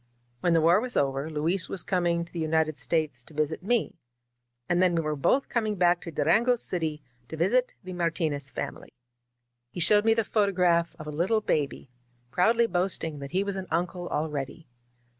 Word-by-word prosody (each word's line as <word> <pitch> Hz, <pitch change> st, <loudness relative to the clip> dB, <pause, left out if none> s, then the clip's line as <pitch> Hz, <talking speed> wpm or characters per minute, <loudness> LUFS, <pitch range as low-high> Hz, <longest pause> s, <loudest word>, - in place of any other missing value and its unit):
When 170 Hz, +6 st, +2 dB
the 165 Hz, -, +4 dB
war 170 Hz, +6 st, +4 dB
was 250 Hz, 0 st, -4 dB
over, 140 Hz, +2 st, 0 dB
Luis 165 Hz, +4 st, 0 dB
was 190 Hz, -, -2 dB
coming 175 Hz, -2 st, 0 dB
to -, -, -19 dB
the 170 Hz, -, -4 dB
United 160 Hz, -1 st, 0 dB
States 155 Hz, -7 st, -2 dB
to 155 Hz, -, -15 dB
visit 155 Hz, +2 st, -1 dB
me; 210 Hz, -2 st, -1 dB, 0.7 s
and 175 Hz, +1 st, +2 dB
then 180 Hz, -2 st, +3 dB
we 165 Hz, -, +1 dB
were 155 Hz, 0 st, -1 dB
both 255 Hz, -, +1 dB
coming 215 Hz, -3 st, -1 dB
back 175 Hz, -1 st, +3 dB
to -, -, -7 dB
Durango 215 Hz, -, +3 dB
City 160 Hz, -9 st, -3 dB, 0.2 s
to 160 Hz, -, -7 dB
visit 240 Hz, +10 st, +1 dB
the 185 Hz, 0 st, -7 dB
Martinez 160 Hz, -5 st, -1 dB
family. -, -, -6 dB, 0.8 s
He 150 Hz, -, -8 dB
showed 205 Hz, +4 st, +6 dB
me 225 Hz, 0 st, +4 dB
the 225 Hz, -, +1 dB
photograph 180 Hz, -6 st, +1 dB
of 155 Hz, -, -9 dB
a 150 Hz, -, -5 dB
little 185 Hz, +9 st, +1 dB
baby, 145 Hz, -8 st, -2 dB, 0.4 s
proudly 225 Hz, -, +3 dB
boasting 175 Hz, -6 st, 0 dB
that 140 Hz, 0 st, -7 dB
he 185 Hz, +5 st, 0 dB
was 200 Hz, -1 st, -3 dB
an 190 Hz, -1 st, -5 dB
uncle 175 Hz, +2 st, -2 dB
already. 150 Hz, +1 st, -4 dB
170 Hz, 185 wpm, -27 LUFS, 155-190 Hz, 0.8 s, showed